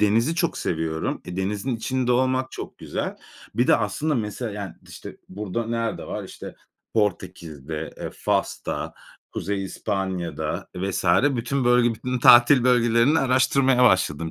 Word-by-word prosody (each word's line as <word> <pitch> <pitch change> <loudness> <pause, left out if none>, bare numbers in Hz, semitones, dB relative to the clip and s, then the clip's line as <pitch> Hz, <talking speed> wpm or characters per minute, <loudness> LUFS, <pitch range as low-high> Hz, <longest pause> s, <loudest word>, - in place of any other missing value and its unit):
denizi 115 +9 +3
çok 170 -1 -1
seviyorum. 80 -1 -2
E, 90 - -7
denizin 105 +6 -2
içinde 125 +2 -1
olmak 130 +1 +1
çok - - -8
güzel. - - -4 0.4
Bir 120 - +2
de - - +5
aslında 145 +8 -1
mesela 110 +1 -3
yani, 100 -2 -6 0.2
işte, - - -10
burada 105 +3 -4
nerede 115 0 -2
var? - - -5
İşte - - -9 0.4
Portekiz'de, 80 -7 -3
eee, - - -5
Fas'ta, - - -2 0.4
Kuzey 100 +1 -3
İspanya'da 95 -3 -3
vs. 95 +1 -2 0.3
bütün 125 +3 -1
bölge, 120 -1 +4
bütün 125 +3 -3
tatil 120 +2 +7
bölgelerini 120 +3 +4
araştırmaya 130 0 +3
başladım. 85 -7 +2
115 Hz, 135 wpm, -24 LUFS, 95-125 Hz, 0.4 s, tatil